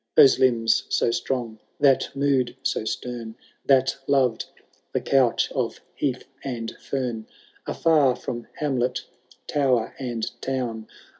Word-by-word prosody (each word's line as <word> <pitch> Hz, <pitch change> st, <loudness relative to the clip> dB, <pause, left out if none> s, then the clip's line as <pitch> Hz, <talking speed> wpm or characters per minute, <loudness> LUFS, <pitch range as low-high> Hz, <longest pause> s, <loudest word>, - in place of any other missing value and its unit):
Those 135 Hz, -, +7 dB
limbs 115 Hz, -3 st, +3 dB
so -, -, +2 dB
strong, 115 Hz, -3 st, -2 dB, 0.2 s
that 140 Hz, -2 st, +4 dB
mood 135 Hz, -3 st, +1 dB
so 125 Hz, -, -1 dB
stem. 115 Hz, -1 st, -4 dB, 0.3 s
That 135 Hz, -1 st, +4 dB
loved 130 Hz, -5 st, +2 dB, 0.5 s
the -, -, +2 dB
couch 130 Hz, -4 st, +2 dB
of -, -, -2 dB
heath 130 Hz, -3 st, -2 dB, 0.2 s
and 115 Hz, -4 st, -4 dB
fern. 120 Hz, -5 st, -3 dB, 0.4 s
Afar 150 Hz, -6 st, +3 dB
from 120 Hz, -1 st, -6 dB
hamlet, 130 Hz, -4 st, -1 dB, 0.4 s
toWer 130 Hz, -6 st, +1 dB
and 120 Hz, -4 st, -2 dB, 0.2 s
town. 120 Hz, -4 st, -3 dB
125 Hz, 120 wpm, -24 LUFS, 115-135 Hz, 0.5 s, Those